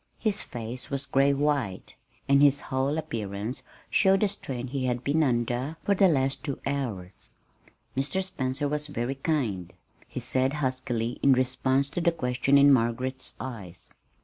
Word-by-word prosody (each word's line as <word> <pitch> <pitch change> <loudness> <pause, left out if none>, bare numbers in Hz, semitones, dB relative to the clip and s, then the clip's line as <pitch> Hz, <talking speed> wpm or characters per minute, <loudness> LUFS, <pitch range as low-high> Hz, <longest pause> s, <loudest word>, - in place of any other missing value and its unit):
His 210 -2 +2
face 120 +3 -4
was 140 -1 0
gray 140 0 +3
white, 140 -9 -1 0.3
and 140 0 +5
his 145 -1 +5
whole 135 +2 -1
appearance 110 -3 -4 0.3
showed 195 -1 +4
the 210 - +4
strain 135 -11 -4
he 130 0 -3
had 125 0 -1
been 150 +3 +2
under 125 +2 0
for 200 - +2
the 195 0 +5
last 135 -5 +1
two 140 -3 -4
hours. 115 -10 -4 0.6
"Mr. 145 +8 0
Spencer 145 -6 -2
was 150 +1 +1
very 125 -2 -2
kind," 120 - -2 0.4
he - - -5
said 130 +1 0
huskily 130 -4 -2
in 140 - +6
response 130 +1 +1
to 175 - -2
the 170 - +3
question 135 -2 +2
in 140 0 +7
Margaret's 130 +2 -1
eyes. 100 -9 -8
135 Hz, 155 wpm, -27 LUFS, 125-145 Hz, 0.6 s, in